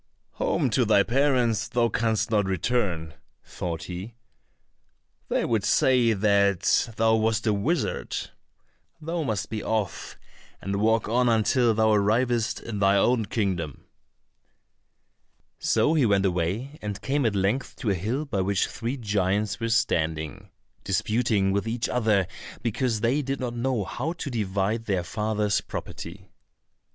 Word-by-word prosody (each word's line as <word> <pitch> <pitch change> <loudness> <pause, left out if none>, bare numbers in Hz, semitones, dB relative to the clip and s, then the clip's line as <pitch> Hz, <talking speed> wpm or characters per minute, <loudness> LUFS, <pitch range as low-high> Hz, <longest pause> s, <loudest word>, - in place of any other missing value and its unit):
"Home - - +1
to - - +3
thy 100 - +4
parents 120 -5 +1
thou 115 +2 +1
canst 115 0 0
not 105 -2 +2
return," 95 -4 -1 0.3
thought 85 -2 -5
he, 95 +6 -7 1.1
"they - - +1
would 110 -4 0
say 125 -1 +3
that 100 +1 +2
thou 110 0 +3
wast 110 0 0
a 110 - +3
wizard; 140 - -2 0.7
thou 165 +2 -3
must 110 -10 -2
be 110 -1 -3
off, 110 -3 -3 0.4
and 100 +1 -3
walk 110 +1 +2
on 120 +2 +2
until 115 +1 +3
thou 110 0 +3
arrivest 115 +2 +1
in 110 -3 -5
thine 100 0 +4
own 115 +2 +2
kingdom." 90 - -2 1.7
So 150 - +2
he 145 -7 +3
went 100 -1 +2
away 95 - -2
and 105 -1 -4
came 140 +6 0
at 105 - -1
length 100 +7 0
to 110 - -1
a - - +3
hill 110 - -2
by 105 -9 -1
which 95 0 +1
three 120 +4 -4
giants 105 -2 0
were 115 -1 -2
standing, 80 - -1 0.3
disputing 105 0 +1
with 100 +3 -1
each 115 +1 -1
other 110 -5 +2 0.4
because 115 -1 -1
they 125 +6 +2
did 135 0 -3
not 125 -2 -3
know 120 -2 -1
how 135 - -3
to 165 -5 -6
divide 105 0 -1
their 95 -5 0
father's 105 +2 0
property. 95 +3 -8
110 Hz, 145 wpm, -26 LUFS, 100-120 Hz, 1.7 s, thy